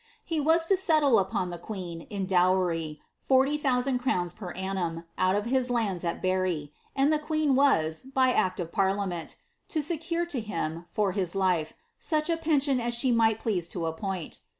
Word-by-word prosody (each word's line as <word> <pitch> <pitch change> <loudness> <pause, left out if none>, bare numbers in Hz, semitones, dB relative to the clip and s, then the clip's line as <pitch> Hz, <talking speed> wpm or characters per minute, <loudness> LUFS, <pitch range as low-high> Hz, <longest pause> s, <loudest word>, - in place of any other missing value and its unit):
He 325 -2 -1
was 325 +3 +3
to 390 - +4
settle 310 - +4
upon 185 -1 -1
the 175 - -6
queen, 175 -4 -7
in 200 -2 -3
dowry, 180 -4 +1 0.2
40,000 265 -1 +2
crowns 180 -9 0
per 190 -3 -8
annum, 180 -3 -3 0.2
out 185 +1 +3
of 205 +1 -1
his 255 +1 +1
lanils 215 -8 -1
at 170 - -3
Berri, 185 -6 0 0.2
and 280 +3 +3
the 305 - +2
queen 305 -2 0
was, 160 - +3
by 260 -1 +2
act 185 -6 +1
of 170 -2 -4
parliament, 190 -3 -1 0.3
to 310 -2 -1
secure 335 +2 -2
to 305 -7 -3
him, 170 -6 -4
for 205 +1 0
his 185 -2 -2
life, 180 -5 +1 0.3
sucli 310 +1 +1
a - - -1
pension 290 -5 +2
as 240 0 -1
she 250 +2 +2
might 225 -2 +3
please 200 -7 -1
to 170 -1 -4
appoint.' 175 +1 -4
205 Hz, 175 wpm, -28 LUFS, 180-275 Hz, 0.3 s, to